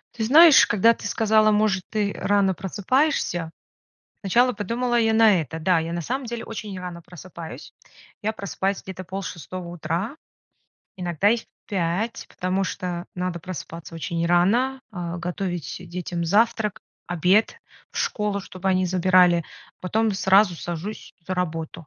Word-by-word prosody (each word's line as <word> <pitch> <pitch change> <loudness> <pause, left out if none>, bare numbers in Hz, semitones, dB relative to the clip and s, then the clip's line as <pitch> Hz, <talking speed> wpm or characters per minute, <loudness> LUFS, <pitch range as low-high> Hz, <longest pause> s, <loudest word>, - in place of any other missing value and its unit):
Ты 225 - -2
знаешь, 305 +4 +8
когда 225 +3 +4
ты 215 - -7
сказала: 215 0 +3
"Может 210 -3 +2
ты 210 -2 -1
рано 200 -2 +2
просыпаешься?" 195 - 0 0.7
Сначала 240 +6 +3
подумала 240 +3 0
я 225 -1 +2
на 220 -4 +5
это, 160 +1 -6
да. 170 +1 +3
Я 165 +1 -4
на 170 - -2
самом 255 - -3
деле 235 0 -5
очень 215 -3 -6
рано 180 -1 -7
просыпаюсь. 170 -1 -10 0.5
Я 220 +1 -1
просыпаюсь 200 -1 -2
где-то 185 0 -7
полшестого 185 -1 -6
утра, 175 - -3 0.8
иногда 175 +1 +1
и 235 - +3
в 230 - -8 0.2
5, 195 +3 -2
потому 185 +2 -1
что 180 -1 -4
надо 180 -1 -3
просыпаться 165 -1 -8
очень 165 +1 -2
рано, 225 +10 +2
а, 175 -4 -5
готовить 175 -1 -4
детям 175 0 -4
завтрак, 215 +3 +1 0.3
обед 180 +5 +2 0.3
в - - -6
школу, 210 -1 -1
чтобы 190 0 -5
они 185 0 +2
забирали, 180 -1 +4 0.4
потом 220 +4 0
сразу 190 0 +4
сажусь 175 +6 -6
за 185 - -2
работу. 165 -2 -4
190 Hz, 145 wpm, -24 LUFS, 175-215 Hz, 0.8 s, знаешь